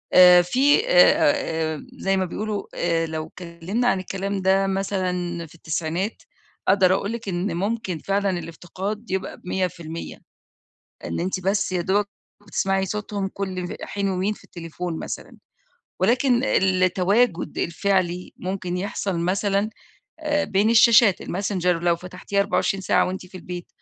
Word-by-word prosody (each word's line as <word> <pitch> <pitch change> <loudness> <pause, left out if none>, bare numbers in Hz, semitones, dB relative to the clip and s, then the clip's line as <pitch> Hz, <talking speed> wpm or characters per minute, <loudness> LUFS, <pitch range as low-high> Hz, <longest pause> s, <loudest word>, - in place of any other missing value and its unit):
آآ، 180 -1 +9
في 265 - +3
آآ، 280 - +3
زي 195 -7 0
ما 190 - +1
بيقولوا 205 +2 -3
آآ، 165 -1 +1
لو 155 0 -4
اتكلمنا 175 +8 -3
عن 190 - +2
الكلام 195 +1 -3
ده 190 +1 +3
مثلًا 180 -3 -2
في 160 - -18
التسعينات 165 +5 -3 0.4
أقدر 190 -2 +5
أقول 200 +3 -1
لِك 230 -3 -5
إن 175 0 -2
ممكن 200 -2 -2
فعلًا 200 +4 0
الافتقاد 185 +6 -6
يبقى 190 0 -3
ب100% 170 -3 -4 0.8
إن - - -3
أنتِ 185 +2 -1
بس 195 +1 0
يا 180 -1 0
دوبك 200 +3 +1 0.4
بتسمعي 195 -3 0
صوتهم 205 0 -3
كُلّ 185 -2 -4
حين 200 -1 -2
ومين 190 +3 0
في - - -17
التليفون 170 0 -6
مثلًا، - - -7 0.6
ولكن 245 +5 +3
التواجد 185 +2 +2
الفعلي 180 0 0
ممكن 185 -1 -3
يحصل 195 -1 -2
مثلًا 200 +4 0 0.5
آآ، 295 -1 0
بين 205 0 +2
الشاشات 230 -3 +6
الMessenger 190 -1 -2
لو 170 -1 +2
فتحتيها 180 +3 -4
24 195 0 +1
ساعة - - +3
وأنتِ 185 0 -5
في 185 +1 -15
البيت 180 -1 -7
190 Hz, 135 wpm, -23 LUFS, 175-205 Hz, 0.8 s, آآ